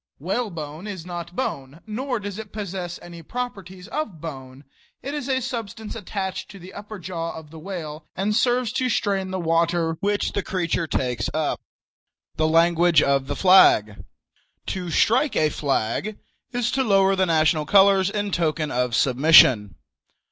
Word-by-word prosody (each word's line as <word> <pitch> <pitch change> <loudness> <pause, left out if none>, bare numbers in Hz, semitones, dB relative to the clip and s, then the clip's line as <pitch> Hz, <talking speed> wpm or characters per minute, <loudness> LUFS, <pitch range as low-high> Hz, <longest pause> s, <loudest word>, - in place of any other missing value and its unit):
Whalebone 170 - -4
is 190 -5 -7
not 175 -1 -7
bone, 140 - -4
nor 245 +3 -3
does 205 0 -6
it 215 -2 -9
possess 185 -4 -5
any 170 -1 -10
properties 195 -5 -6
of 260 - -4
bone. 135 -4 -9 0.4
It 280 +3 -4
is 290 -3 -4
a 260 -1 +1
substance 225 -3 -5
attached 190 -3 -5
to 200 - -11
the 185 +1 -12
upper 210 +1 -8
jaw 170 -2 -5
of 155 -2 -11
the 160 - -10
whale, 155 -4 -7
and 200 +3 0
serves 245 0 +2
to 255 -1 0
strain 195 -4 0
the 185 0 -3
water 165 0 +1
which 205 +1 0
the 200 - -1
creature 170 -3 -2
takes 125 -7 -1
up. - - -1 0.7
THE 155 0 +1
LANGUAGE 170 0 +4
OF 140 -1 +1
THE 145 - -3
FLAG. 180 - +5 0.6
To 180 -2 -4
"strike 250 - +2
a 155 - +3
flag" 140 - -2 0.3
is 245 -1 -1
to 270 - +1
lower 195 -3 +3
the 190 -1 +1
national 155 -2 +2
colors 195 0 +5
in 205 0 -2
token 155 -3 -1
of 125 -1 0
submission. 130 - +5
180 Hz, 160 wpm, -23 LUFS, 155-205 Hz, 0.7 s, FLAG